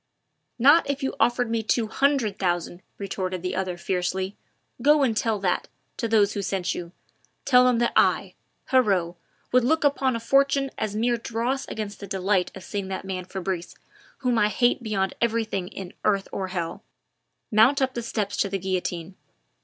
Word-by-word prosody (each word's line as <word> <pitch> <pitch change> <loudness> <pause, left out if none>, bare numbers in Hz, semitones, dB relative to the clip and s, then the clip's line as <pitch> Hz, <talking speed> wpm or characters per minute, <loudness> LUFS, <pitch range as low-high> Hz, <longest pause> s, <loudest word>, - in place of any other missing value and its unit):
"Not 285 +6 +5
if 280 0 -2
you 270 - -1
offered 245 0 +2
me 230 -1 +1
two 225 +1 +1
hundred 235 -3 +1
thousand," 175 -1 -1 0.2
retorted 185 -2 -4
the 180 - -2
other 185 -1 -2
fiercely. 185 +2 -2 0.5
"Go 295 +2 +5
and 235 -5 +1
tell 220 0 +1
that, 180 -2 0 0.3
to 230 - -1
those 210 -2 +3
who 205 - -2
sent 190 -1 -1
you. 170 -1 -6 0.5
Tell 250 -2 +6
them 250 -2 +3
that 235 0 +1
I - - +3 0.4
Heriot 195 -10 +3 0.4
would 250 0 +4
look 315 +6 +2
upon 275 -3 +2
a - - -2
fortune 275 +3 +2
as 210 -1 -3
mere 235 +2 +1
dross 235 +4 -2
against 210 -2 -5
the 200 - -8
delight 190 -1 0
of 190 - -9
seeing 200 -1 -4
that 190 0 -5
man 185 -1 -4
Fabrice, 185 -2 -4 0.5
whom 250 -3 +2
I 210 - +4
hate 240 +5 +2
beyond 200 -4 -1
everything 220 -5 0
in 185 -1 -8
earth 195 -2 +1
or 190 - -3
hell, 175 -3 -4 0.7
mount 230 +7 +5
up 265 -1 +1
the 240 - -3
steps 210 -3 -2
to 200 - +1
the 195 - -1
guillotine. 185 -2 -3
210 Hz, 175 wpm, -25 LUFS, 190-245 Hz, 0.7 s, Tell